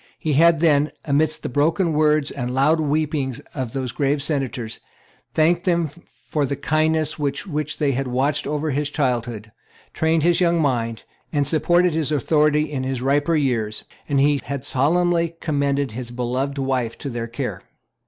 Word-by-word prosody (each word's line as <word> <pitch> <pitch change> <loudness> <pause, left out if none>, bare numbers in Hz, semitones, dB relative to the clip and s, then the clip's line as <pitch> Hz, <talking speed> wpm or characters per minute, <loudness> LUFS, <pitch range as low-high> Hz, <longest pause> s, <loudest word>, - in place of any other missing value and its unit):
He 155 - -1
had 165 +2 +5
then, 150 -2 +4 0.2
amidst 155 +1 +1
the - - -2
broken 160 +6 +1
words 150 -1 +2
and 125 -2 -4
loud 150 +5 +3
weeping 150 -3 0 0.2
of 130 -5 -4
those 130 -3 -3
grave 140 0 0
Senators, 130 -7 -3 0.6
thanked 170 +3 +3
them 170 -4 +1 0.4
for 150 - 0
the 140 - -2
kindness 155 +2 0
with 140 +1 -2
which 150 -4 -3
they 145 -3 +1
had 135 +1 -2
watched 135 +4 0
over 150 +1 -1
his 145 +2 -1
childhood, 120 -7 -2 0.4
trained 160 -1 +1
his 175 +1 +3
young 170 -1 +3
mind, 115 -6 -1 0.3
and 145 -3 +1
supported 175 +3 +3
his 155 -2 0
authority 150 +1 +2
in 145 -4 -4
his 130 -1 -3
riper 145 +4 +2
years; 115 -7 -1 0.3
and 140 -1 +2
he 145 0 +3
had 140 0 -4
solemnly 170 +4 +1
commended 140 -3 0
his 120 +2 -6
beloved 125 +3 -2
wife 130 -4 -1
to - - -7
their 115 -1 -4
care. 115 0 -4
145 Hz, 165 wpm, -22 LUFS, 130-155 Hz, 0.6 s, had